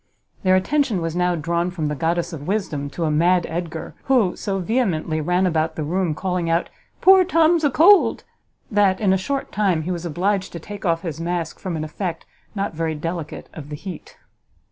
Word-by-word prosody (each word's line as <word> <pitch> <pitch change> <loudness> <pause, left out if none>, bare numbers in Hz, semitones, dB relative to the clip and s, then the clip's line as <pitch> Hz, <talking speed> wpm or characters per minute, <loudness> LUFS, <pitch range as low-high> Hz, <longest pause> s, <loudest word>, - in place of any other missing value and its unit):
Their 185 -1 +4
attention 235 +2 +1
was 165 -1 -3
now 180 0 +1
drawn 170 +2 -1
from 175 -4 -4
the 150 - -1
goddess 170 +3 -1
of 145 -2 -7
wisdom 170 -9 -2
to 170 - -4
a 155 - +1
mad 175 +4 +3
Edgar, 165 -1 -5
who 240 -9 +3
so 195 -1 -2
vehemently 180 -7 0
ran 180 +4 +1
about 160 -2 0
the 155 - -3
room 170 +1 0
calling 180 -1 -2
out 165 +1 +1 0.3
"Poor 380 0 +7
Tom's 330 -1 +3
a 290 - +4
cold!" 350 +8 +5 0.5
that, 200 -3 +3
in 195 -3 +3
a - - +4
short 275 +9 -3
time, 190 -6 +1
he 180 - -3
was 175 -2 -3
obliged 185 +4 -1
to 170 - -5
take 205 +4 -8
off 165 -1 +1
his 165 -2 -4
mask, 170 -1 -3
from 185 -3 -4
an 155 - -3
effect, 165 +2 -4 0.3
not 200 -2 -2
very 160 0 -2
delicate, 165 0 -5
of 150 -3 -9
the 150 - -5
heat! 180 +2 -9
175 Hz, 200 wpm, -22 LUFS, 160-195 Hz, 0.5 s, Poor